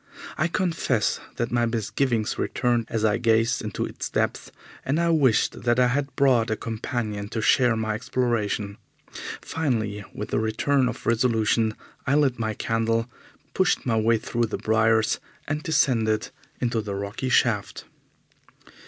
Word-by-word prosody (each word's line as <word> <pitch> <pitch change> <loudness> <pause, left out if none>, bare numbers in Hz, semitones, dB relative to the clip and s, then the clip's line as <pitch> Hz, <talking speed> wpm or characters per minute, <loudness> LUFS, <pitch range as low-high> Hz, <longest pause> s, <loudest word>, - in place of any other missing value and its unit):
I 160 - +1
confess 165 - 0 0.2
that 120 - -2
my 120 -1 +2
misgivings 115 +1 -1
returned 120 -2 0
as 110 -1 0
I 110 +1 +2
gazed 115 0 +2
into 105 - -3
its - - -6
depths, - - -1 0.3
and 140 +5 0
I 170 0 +2
wished 135 -8 +2
that 120 0 +2
I 125 -1 +4
had 140 +2 -2
brought 125 -5 +3
a 110 - +1
companion 110 -2 -4
to 115 - -3
share 120 +1 +4
my 110 -1 -1
exploration. 110 -3 -1 0.7
Finally, 110 -10 -2
with 105 - -6
a - - +3
return 125 +4 +1
of 125 - -7
resolution, 115 -2 +2 0.3
I 135 - +3
lit 140 -5 +2
my 110 -1 -1
candle, 115 +2 0 0.4
pushed 190 -1 +1
my 120 -3 +1
way 110 +1 +3
through 120 +1 -1
the 110 - -3
briars, 110 0 +2 0.3
and 150 +1 -2
descended 115 -9 +1 0.3
into 120 -2 0
the 105 -2 -5
rocky 100 +6 -4
shaft. 115 -5 +1
115 Hz, 150 wpm, -25 LUFS, 110-125 Hz, 0.7 s, I